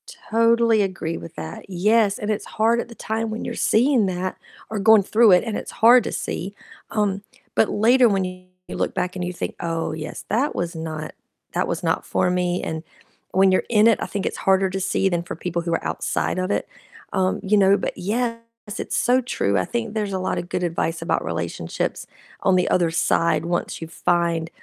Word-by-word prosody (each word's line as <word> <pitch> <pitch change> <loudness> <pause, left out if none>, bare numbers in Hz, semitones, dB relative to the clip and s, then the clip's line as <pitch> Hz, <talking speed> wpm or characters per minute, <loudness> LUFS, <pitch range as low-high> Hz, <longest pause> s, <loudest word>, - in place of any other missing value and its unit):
Totally 230 0 +2
agree 185 -4 -2
with 85 - -10
that, 80 0 -7
yes, 205 +3 +2
and 210 +1 -2
it's 210 - -2
hard 225 +2 +1
at - - -3
the 235 - -11
time 225 +1 -3
when 220 +1 -5
you're - - -4
seeing 240 -2 +3
that, 185 0 -3 0.3
or 215 0 -3
going 215 0 +6
through 220 +2 +5
it, 180 - +6
and 225 -3 -3
it's - - -5
hard 240 +2 +6
to - - -3
see, 195 +3 -4 0.3
um, 205 -2 0 0.3
but 220 - +3
later 240 +3 +4
when 195 -2 +1
you 185 0 -8 0.2
look - - -2
back 180 +1 -2
and 180 - -3
you 180 - -2
think, 180 - -5
"Oh, 165 -2 -2
yes, 155 0 -7
that 255 +8 0
was 175 0 -3
not 160 -1 -5 0.4
that - - 0
was - - -3
not - - 0
for - - +1
me," 180 0 0
and 160 0 -4 0.5
when 190 0 +4
you're 185 - +2
in 215 -2 +4
it, 230 - +4
I - - -2
think 200 -1 -3
it's - - -2
harder 190 0 +2
to 190 - -2
see 195 0 +1
than 175 -3 0
for - - -6
people 175 +1 -3
who 170 0 -2
are - - -4
outside - - -1
of 185 +1 -1
it, - - -1 0.5
um, 185 -1 +1
you 205 +1 +2
know, 195 0 +5
but - - -3
yes, 230 +4 -1 0.4
it's - - -2
so 250 +2 +3
true, 100 - 0
I 95 - +1
think 230 -3 -3
there's 210 -3 -2
a 190 - -1
lotta 185 -1 -1
good 180 +1 -3
advice 165 -1 -1
about 165 - 0
relationships - - -3 0.3
on 190 - +3
the 180 -1 +2
other 175 -2 +2
side 165 0 +1
once 175 0 -2
you 165 - -5
find 170 -1 0
190 Hz, 210 wpm, -22 LUFS, 175-220 Hz, 0.5 s, going